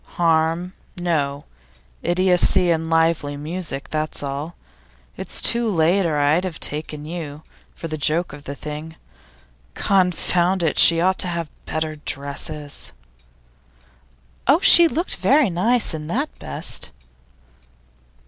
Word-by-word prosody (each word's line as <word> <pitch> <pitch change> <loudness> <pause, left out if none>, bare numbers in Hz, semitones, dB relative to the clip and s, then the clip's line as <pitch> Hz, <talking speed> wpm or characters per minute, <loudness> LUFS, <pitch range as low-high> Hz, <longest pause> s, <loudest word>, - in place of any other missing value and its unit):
'Harm, 165 +2 0 0.3
no. 145 -5 -2 0.6
Idiocy 180 0 +3
and 160 0 -2
lively 165 -3 0
music, 155 -2 -5
that's 155 -1 -3
all. 145 +4 -5 0.6
It's - - +1
too 235 -1 +3
late, 175 +1 +1
or 155 -2 -1
I'd 145 +5 +2
have 180 -4 -5
taken 150 0 -3
you, 155 -2 -7 0.3
for 165 - -7
the 155 -1 -6
joke 155 +2 0
of 145 0 -12
the 140 - -6
thing. 150 +2 -8 0.8
Confound 180 -1 0
it! 160 - 0
she 165 -1 +7
ought 185 +2 +1
to - - +2
have 170 -3 -4 0.2
better 155 -1 -3
dresses.' 145 +1 -3 1.5
'Oh, 280 +6 +5
she 345 -2 +9
looked 335 +3 -2
very 280 -8 +2
nice, 225 +5 +2
in 150 -1 -6
that 275 - -2
best. 70 - -5
165 Hz, 125 wpm, -21 LUFS, 150-180 Hz, 1.5 s, she